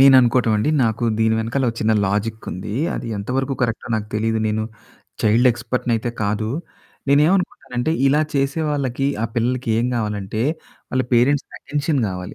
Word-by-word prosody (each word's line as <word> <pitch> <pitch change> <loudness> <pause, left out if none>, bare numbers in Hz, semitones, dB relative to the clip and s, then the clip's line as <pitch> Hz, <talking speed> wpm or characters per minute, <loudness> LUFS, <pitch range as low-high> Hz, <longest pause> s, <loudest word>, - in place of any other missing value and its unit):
నేననుకోవటం 130 -3 +6
అండి. 105 +8 +1
నాకు 110 +1 0
దీని 110 0 +3
వెనకాల 115 +5 -1
ఒక - - -11
చిన్న 110 +1 +3
లాజిక్ 105 +3 -2
ఉంది. 95 +3 -5 0.2
అది - - -4
ఎంత 100 0 -6
వరకు 135 +1 0
కరెక్టో 115 -2 -1
నాకు 105 -1 -4
తెలియదు. 110 +1 +1
నేను 110 +1 0 0.6
చైల్డ్ 115 +4 +5
ఎక్స్పర్ట్ 120 +2 -3
అయితే 115 +1 -1
కాదు. 105 +1 0 0.6
నేనేవనుకుంటానంటే, 150 -3 +2
ఇలా 145 +3 +4
చేసేవాళ్ళకి, 140 -2 0 0.2
ఆ - - +2
పిల్లలకి 125 +1 0
ఏం 120 - +1
కావాలంటే 105 -1 -2 0.5
వాళ్ళ 130 0 +1
పేరెంట్స్‌కి 130 +4 +3
అటెన్షన్ 145 -1 -1
కావాలి. 90 -1 -6
120 Hz, 150 wpm, -21 LUFS, 110-135 Hz, 0.6 s, నేననుకోవటం